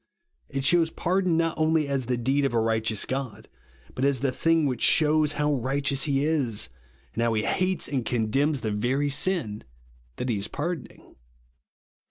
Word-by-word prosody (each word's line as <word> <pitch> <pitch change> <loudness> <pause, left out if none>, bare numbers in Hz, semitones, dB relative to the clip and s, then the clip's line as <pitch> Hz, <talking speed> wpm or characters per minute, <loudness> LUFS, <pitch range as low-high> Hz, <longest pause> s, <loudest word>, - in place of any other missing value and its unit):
It 135 -1 -3
shews 165 +3 +3
pardon 180 0 0
not 165 -1 0
only 155 -1 +2
as 135 -3 -1
the 125 -1 0
deed 135 +4 +1
of 135 -3 0
a - - +3
righteous 110 -1 +1
God, 125 -5 -5 0.5
but 130 - -3
as 140 -3 +1
the 135 -2 +1
thing 165 +3 +2
which 130 -4 -2
shews 155 -1 +3
how 150 0 0
righteous 135 +1 0
he 140 -1 +1
is, 130 - 0 0.4
and - - -2
how 115 0 +2
he 105 - 0
hates 185 - 0
and 135 -4 -2
condemns 125 +6 0
the 110 - -2
very 130 +7 0
sin 140 - 0 0.5
that 125 - -4
he 110 -4 0
is 100 - -2
pardoning. 150 +4 -6
140 Hz, 175 wpm, -26 LUFS, 120-155 Hz, 0.5 s, shews